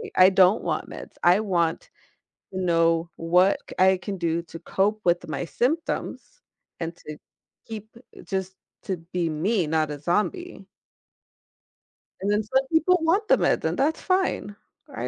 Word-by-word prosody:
I 185 0 +7
don't 190 +2 +4
want - - -2
meds, - - -9
I 180 +4 +5
want 170 -6 -1 0.7
you 185 - -2
know, 165 -1 +2
what 180 +4 +3
c - - -8
I 190 +1 +5
can 195 +1 -6
do 170 -1 -1
to 165 0 -10
cope 205 +5 0
with 175 0 +1
my 155 +3 -3
symptoms 330 - -3 0.4
and 165 0 -4
to 155 -3 -9 0.5
keep 220 -1 -8 0.4
just 190 -1 -3 0.3
to 190 -2 -3
be 175 -2 0
me, 180 +4 0
not 155 0 0
a 145 - -5
zombie. 210 - -2 1.6
And 200 +2 0
then 210 +1 +1
some 265 +5 0
people 330 +3 +4
want 375 +7 +1
the - - +5
meds, - - +1
and - - -1
that's 300 +4 0
fine. 370 - 0 0.4
I - - -3
190 Hz, 155 wpm, -25 LUFS, 170-225 Hz, 1.6 s, I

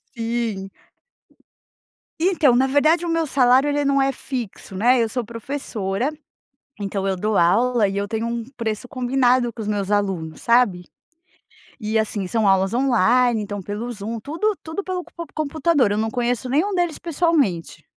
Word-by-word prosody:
Sim. 230 -4 -2 1.5
Então, 325 -8 +3
na 265 +2 +3
verdade, 310 +5 +3
o - - -2
meu 330 0 +1
salário 265 0 +4
ele 290 0 0
não 275 0 +2
é 270 0 +2
fixo, 245 -7 -6
né, 240 +5 +4
eu 225 - 0
sou 245 0 -3
professora, 230 -1 -3 0.7
então 195 -1 -2
eu 195 - +1
dou 210 +3 -1
aula 220 +6 +3
e 195 0 -3
eu 200 0 -2
tenho 225 +2 -2
um 235 -1 -3
preço 225 0 -3
combinado 250 -1 +1
com 225 - -10
os 210 - -4
meus 205 -2 -1
alunos, 190 -6 -1
sabe? 235 -7 +2 0.9
E, 215 -1 -1
assim, 210 -3 -1
são 220 +2 +1
aulas 195 +1 +3
online, 245 -2 +3
então, 205 -1 -5
pelo 210 +5 -5
Zoom, 225 +1 -5
tudo 335 - -1
tudo 320 +5 -5
pelo 370 -1 -3
comp 335 -1 -7
computador. 305 -5 +1
Eu 205 - 0
não 220 +1 -1
conheço 245 0 -1
nenhum 315 +11 +1
deles 350 -3 0
pessoalmente. 285 - 0
235 Hz, 165 wpm, -22 LUFS, 205-275 Hz, 1.5 s, salário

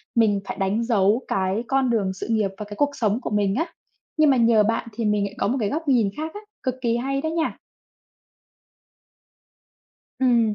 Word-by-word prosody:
mình 215 -4 +3
phải - - -5
đánh 195 +4 0
dấu 220 0 +2
cái 190 +4 0
con 270 -1 +2
đường 205 -5 +1
sự 190 - -6
nghiệp 215 -4 +1
và 210 - -5
cái 205 0 -8
cuộc 290 +6 +2
sống 220 -2 0
của - - -4
mình 205 -2 +1
á. 330 +5 -2 0.4
Nhưng 310 -1 +5
mà 265 - +4
nhờ 230 -2 +5
bạn 230 +2 -1
thì 230 +1 -3
mình 210 -1 +2
lại 200 +1 -7
có - - 0
một 255 - 0
cái 210 -3 0
góc 315 +4 -3
nhìn 235 -7 +3
khác 315 +1 -4
á, 415 - -7 0.2
cực 255 -1 -1
kỳ 235 -1 +1
hay 275 +2 -1
đó 315 - -1
nha. 325 0 -1 2.6
Ừm. 235 -4 +3
230 Hz, 205 wpm, -23 LUFS, 205-265 Hz, 2.6 s, Nhưng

